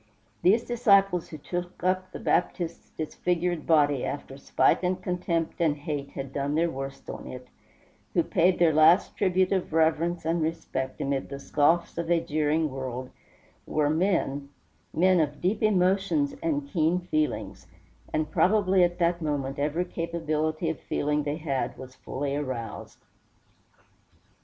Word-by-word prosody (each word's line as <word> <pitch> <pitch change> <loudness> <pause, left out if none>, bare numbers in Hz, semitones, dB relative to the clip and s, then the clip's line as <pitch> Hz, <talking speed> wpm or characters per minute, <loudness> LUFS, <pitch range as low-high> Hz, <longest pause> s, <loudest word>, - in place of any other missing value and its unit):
These 215 +6 +4
disciples 200 -7 +3
who 155 - -7
took 175 +4 -6
up 185 0 0
the - - -7
Baptist's 170 -1 -1
disfigured 175 +1 -1
body 145 -4 +3
after 140 -2 -5
spite 140 - +2
and 180 0 0
contempt 175 -2 -2
and 155 -3 +2
hate 145 -1 -4
had 135 -1 -6
done 140 +1 -1
their 165 +1 +2
worst 135 -1 -7
on - - -7
it, 125 0 -8 0.7
who - - +4
paid 180 +2 +2
their 165 -2 +4
last 155 +5 +5
tribute 185 -1 +2
of 190 -4 -1
reverence 165 +1 +1
and 165 +1 +1
respect 155 -5 -3
amid 140 -1 -2
the 140 - -5
scoffs 160 +5 +1
of 170 0 -3
a 170 -1 +4
jeering 155 0 0
world, 130 -1 -5 0.6
were 150 -1 +1
men 155 -5 0 0.4
men 185 +2 +3
of 150 -2 0
deep 185 +5 0
emotions 200 - +2
and 295 -3 -1
keen 170 - +1
feelings; 155 -4 -2 0.4
and 155 -1 -1
probably 195 -2 +3
at 175 0 +1
that 170 0 +1
moment 140 -2 -2
every 155 +5 0
capability 160 -1 -2
of 160 - -8
feeling 150 +1 -1
they 145 +1 -2
had 140 -5 -2
was 130 -1 -10
fully 140 +2 -4
aroused. 130 -6 -5
165 Hz, 145 wpm, -27 LUFS, 145-180 Hz, 0.7 s, last